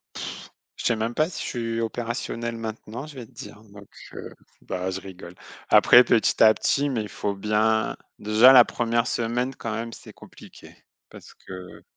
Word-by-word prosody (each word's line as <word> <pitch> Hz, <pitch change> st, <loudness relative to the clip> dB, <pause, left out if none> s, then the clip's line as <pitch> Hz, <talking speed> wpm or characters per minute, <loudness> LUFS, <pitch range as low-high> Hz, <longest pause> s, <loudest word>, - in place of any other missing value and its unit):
Pff, -, -, -7 dB, 0.3 s
je -, -, -8 dB
sais 115 Hz, -, +2 dB
même 115 Hz, +2 st, -3 dB
pas 155 Hz, +2 st, +1 dB
si -, -, -7 dB
je -, -, -4 dB
suis 115 Hz, -2 st, -3 dB
opérationnel 115 Hz, 0 st, -4 dB
maintenant, 115 Hz, +4 st, -7 dB
je 150 Hz, -, -12 dB
vais 120 Hz, -3 st, -8 dB
te -, -, -25 dB
dire, 105 Hz, -, -11 dB
donc 100 Hz, -1 st, -15 dB, 0.3 s
heu, -, -, -8 dB, 0.3 s
bah, 90 Hz, +1 st, -4 dB
je 95 Hz, -, -5 dB
rigole. 90 Hz, -2 st, -11 dB, 0.3 s
Après, 125 Hz, +1 st, +7 dB
petit 115 Hz, -, +2 dB
à 110 Hz, -1 st, +7 dB
petit, 145 Hz, +1 st, 0 dB
mais 120 Hz, -5 st, -2 dB
il 105 Hz, -, -7 dB
faut 100 Hz, -1 st, -3 dB
bien 110 Hz, +2 st, 0 dB, 0.2 s
déjà, 110 Hz, +5 st, +6 dB
la 125 Hz, -2 st, +9 dB
1re 115 Hz, 0 st, -1 dB
semaine 120 Hz, +3 st, -2 dB
quand 115 Hz, -, -6 dB
même, 115 Hz, +1 st, -5 dB
c'est -, -, -12 dB
compliqué, -, -, -15 dB, 0.4 s
parce -, -, -14 dB
que 95 Hz, -1 st, -11 dB
115 Hz, 185 wpm, -24 LUFS, 105-120 Hz, 0.4 s, la